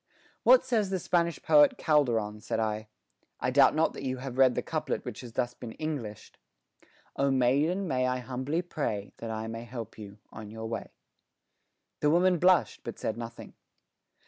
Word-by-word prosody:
"What 255 +1 +6
says 225 -6 +1
the 190 - 0
Spanish 170 -2 0
poet 290 -3 +5
Calderon?" 115 -9 +1
said - - -2
I. 110 -1 -2 0.5
"I - - 0
doubt - - +5
not 160 +1 +2
that - - -8
you 130 -1 -2
have 130 0 -6
read 130 -2 +6
the - - -1
couplet - - -3
which - - -6
has 120 - -9
been 120 -1 -3
thus - - -10
Englished: 140 -10 -5 0.8
Oh, 140 0 +2
maiden, 140 +9 +2
may 130 -4 +1
I 125 0 0
humbly 130 +6 -3
pray 115 - -3
That 115 - -6
I 110 0 -3
may 115 +1 -6
help 115 -2 -8
you 100 -1 -10
on 110 -1 -9
your 110 +1 -7
way." 115 0 -4 1.1
The 150 - +2
woman 175 +2 +3
blushed, 180 -2 +3
but - - -6
said 110 - -2
nothing. 115 0 -8
130 Hz, 175 wpm, -29 LUFS, 115-160 Hz, 1.1 s, What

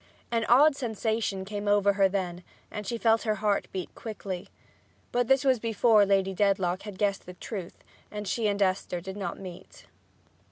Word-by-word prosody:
An 230 -1 +1
odd 280 +4 +6
sensation 220 -5 -2
came 205 +1 -5
over 205 0 +4
her 195 -1 +3
then 180 -2 -3 0.3
and 210 -2 -6
she 235 - -2
felt 225 -1 +3
her 215 -2 0
heart 210 -1 0
beat 185 -2 -5
quickly. 195 -5 -6 0.6
But 245 -1 +1
this 270 +1 +4
was 260 -3 +3
before 225 -2 +4
Lady 195 -1 +2
Dedlock 190 -2 +1
had 205 -2 -8
guessed 200 -2 -1
the 180 - -9
truth, 185 -2 -7 0.3
and 210 0 -6
Esther 200 -3 0
and 175 - -9
she 190 - -4
did - - -10
not 195 -4 -4
meet. 180 -3 -11
205 Hz, 175 wpm, -28 LUFS, 190-225 Hz, 0.6 s, odd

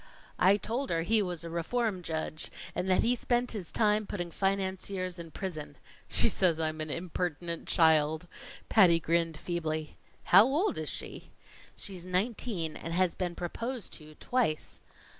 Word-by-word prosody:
I 195 +2 +6
told 245 +6 -2
her 165 -1 +1
he 220 +4 +3
was 180 -4 -3
a 170 - -6
reform 190 +4 -1
judge, 160 -1 -3 0.2
and 185 - -2
that 185 - +4
he 240 - +3
spent 245 0 0
his 195 -7 -5
time 210 -1 +2
putting 175 -4 -4
financiers 190 -1 -1
in 165 -1 -7
prison. 160 -4 -6 0.3
She - - +5
says 170 -4 +2
I'm 155 -1 -2
an 155 - -4
impertinent 170 0 -3
child," 160 0 +3 0.4
Patty 180 -6 +6
grinned 165 0 0
feebly. 155 -3 -3 0.3
"How 195 +4 +8
old 305 - +1
is - - -3
she?" - - -6 0.5
"She's 185 -3 -3
nineteen, 185 -2 -1
and 165 +1 -5
has 185 -1 +2
been 175 -2 -3
proposed 230 +6 -4
to 155 -1 -8
twice." 230 -10 -1
180 Hz, 155 wpm, -30 LUFS, 165-205 Hz, 0.5 s, How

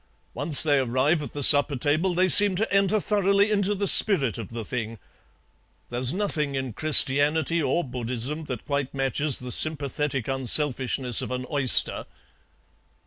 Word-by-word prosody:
Once 145 +3 +4
they 145 -3 0
arrive 130 +6 -2
at 145 - -9
the 145 - -3
supper 145 +1 +4
table 155 +8 -2
they 185 +1 0
seem 200 0 +7
to 215 +4 -4
enter 200 +2 0
thoroughly 200 0 -1
into 205 0 -1
the 200 0 -4
spirit 140 - +3
of 110 - -9
the 115 -1 -9
thing. 115 -1 -7 0.9
There's 125 +1 +1
nothing 155 -7 -4
in 130 -3 -6
Christianity 155 +4 +1
or 155 +4 -2
Buddhism 125 +4 -6
that 125 -6 -9
quite 140 -2 -5
matches 135 +1 +1
the 125 0 -8
sympathetic 145 -3 -3
unselfishness 130 -2 0
of - - -7
an 125 0 -6
oyster. 135 -4 +2
145 Hz, 150 wpm, -22 LUFS, 130-170 Hz, 0.9 s, seem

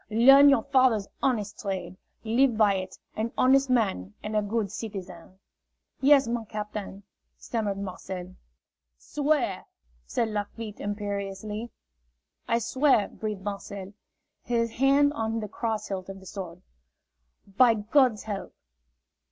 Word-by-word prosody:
Learn 270 +6 +8
your 275 - +4
father's 255 -7 +3
honest 215 -6 -1
trade. 185 -3 -4 0.3
Live 235 +1 +2
by 210 -2 +5
it, 185 -1 -5 0.2
an 225 +2 -2
honest 270 +1 +4
man 195 - 0
and 210 0 -4
a 210 - +3
good 205 -1 -2
citizen." 190 -5 -8 0.6
"Yes, 275 -1 +5
my 235 0 -2
captain," 210 -2 -6 0.3
stammered 210 -4 -2
Marcel. 185 -1 -6 0.6
"Swear!" 285 - -1 0.4
said 230 - 0
Lafitte, 210 +1 -5
imperiously. 205 +2 -4 0.8
"I 230 - +2
swear!" 260 -1 +2
breathed 210 -3 -5
Marcel, 200 -1 -6 0.5
his 230 -1 0
hand 275 +4 +3
on 225 -3 -2
the 210 - -4
cross 220 +1 -3
hilt 190 -1 -4
of 195 0 -8
the 190 - -15
sword. 180 -2 -8 0.9
"By 245 -1 +6
God's 220 +1 +2
help!" 205 -3 -6
215 Hz, 125 wpm, -27 LUFS, 195-240 Hz, 0.9 s, Learn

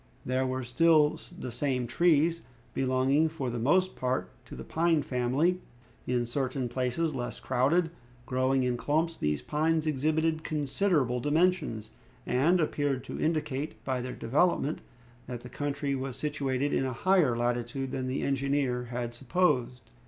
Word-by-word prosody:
There 130 +1 0
were 130 0 -2
still 150 +4 +4 0.2
the 125 - -5
same 125 0 -1
trees, 165 +4 +3 0.3
belonging, 135 +4 +2
for 140 -6 -4
the 120 - -3
most 185 +10 +2
part, 130 0 -2
to - - -10
the 65 - -7
pine 165 - +1
family. 140 +8 +1 0.5
In 125 -1 +1
certain 130 +1 -2
places, 130 +6 -1
less 120 0 -4
crowded, 160 +7 +1 0.3
growing 130 +1 +1
in 125 -1 0
clumps, 160 +6 0
these 75 - -1
pines 160 - +1
exhibited 155 +2 +1
considerable 145 -3 0
dimensions, 150 - +1 0.3
and 150 +9 +3
appeared 145 -4 0
to - - -6
indicate, 155 -2 -1
by 130 -2 -1
their 125 +1 -5
development, 150 +4 +1 0.5
that 120 -2 -5
the 125 - -10
country 145 0 -2
was 135 -1 -4
situated 140 -2 -1
in - - +2
a 130 - -3
higher 170 -6 +3
latitude 120 +2 -1
than 130 -1 -3
the 130 +2 -2
engineer 135 -2 0
had 120 0 -4
supposed. 125 -4 0
135 Hz, 145 wpm, -29 LUFS, 125-155 Hz, 0.5 s, still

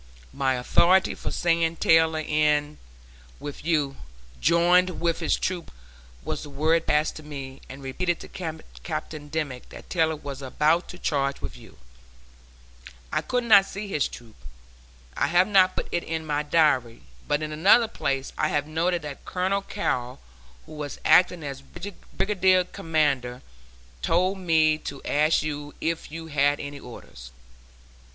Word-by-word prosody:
My 135 -1 +1
authority 175 +9 +3
for - - -5
saying 165 -1 +1
Taylor 160 0 +4
went 155 -1 -3
in 150 -1 +1 0.6
with 145 -1 -7
you, 150 -4 0 0.4
"joined 175 - +3
with 170 -1 0
his - - +1
troop" 180 -3 -3 0.5
was - - -3
the 145 - -9
word 160 +4 +1
passed 150 +1 +2
to - - -8
me 140 -3 -8
and 135 +1 -9
repeated 170 +6 -1
to - - -9 0.5
Captain 155 -2 -5
Dimmick 145 -5 -4
that - - -12
Taylor 160 -3 +2
was 140 -2 -8
about 150 +6 +1
to 180 - -8
charge 140 -5 -1
with - - -6
you. - - -15 1.4
I - - +1
could 250 -1 -1
not 205 -4 +7
see 200 +1 -6
his 150 -7 0
troop. 115 -2 -12 0.8
I - - +1
have 175 +2 +4
not 190 -3 +4
put - - -3
it 175 - -1
in 160 0 -4
my 150 -1 0
diary, 145 - +2 0.2
but 145 +1 0
in 155 - -4
another 195 +9 +5
place 135 -10 -3
I 155 - +3
have 145 -1 0
noted 165 +2 -1
that 145 -2 -8
Colonel 190 +2 -1
Carrol, 130 -12 -3 0.5
who - - -15
was 150 -2 -6
acting 180 -2 +5
as 140 -1 -6
brigade 185 +2 -1
commander, 145 -9 0 0.6
told 185 - +1
me 160 -3 +3
to 140 -3 -7
ask 150 +1 +2
you 145 -1 -5
if 165 -2 -3
you 165 +1 -6
had 145 -2 +1
any 145 0 -6
orders. 65 - -11
155 Hz, 155 wpm, -25 LUFS, 145-175 Hz, 1.4 s, not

